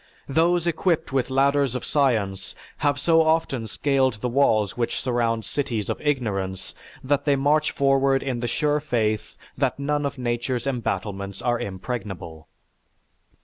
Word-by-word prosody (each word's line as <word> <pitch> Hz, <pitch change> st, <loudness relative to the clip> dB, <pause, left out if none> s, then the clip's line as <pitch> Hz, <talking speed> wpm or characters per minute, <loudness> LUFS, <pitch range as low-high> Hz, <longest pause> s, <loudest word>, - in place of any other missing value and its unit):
Those 170 Hz, +4 st, +2 dB
equipped 170 Hz, -3 st, 0 dB
with 130 Hz, -2 st, +1 dB
ladders 135 Hz, -1 st, +2 dB
of 125 Hz, -, -3 dB
science 110 Hz, -10 st, 0 dB, 0.2 s
have 145 Hz, -1 st, +1 dB
so 165 Hz, +1 st, +4 dB
often 160 Hz, -7 st, +1 dB
scaled 135 Hz, +1 st, +1 dB
the 115 Hz, +4 st, -3 dB
walls 110 Hz, -6 st, +2 dB
which 120 Hz, -1 st, -1 dB
surround 115 Hz, -3 st, 0 dB
cities 120 Hz, -7 st, -2 dB
of -, -, -5 dB
ignorance 105 Hz, -10 st, -2 dB, 0.3 s
that 140 Hz, +1 st, 0 dB
they 145 Hz, -2 st, +4 dB
march 150 Hz, +3 st, +2 dB
forward 135 Hz, -1 st, +2 dB
in 130 Hz, -3 st, -2 dB
the 120 Hz, -, -2 dB
sure 150 Hz, +4 st, +1 dB
faith 110 Hz, -7 st, -1 dB, 0.2 s
that -, -, 0 dB
none 145 Hz, +1 st, 0 dB
of 140 Hz, -, -7 dB
Nature's 120 Hz, 0 st, -2 dB
battlements 100 Hz, -6 st, -3 dB
are 120 Hz, -1 st, 0 dB
impregnable." 95 Hz, -6 st, -6 dB
130 Hz, 145 wpm, -24 LUFS, 110-145 Hz, 0.3 s, so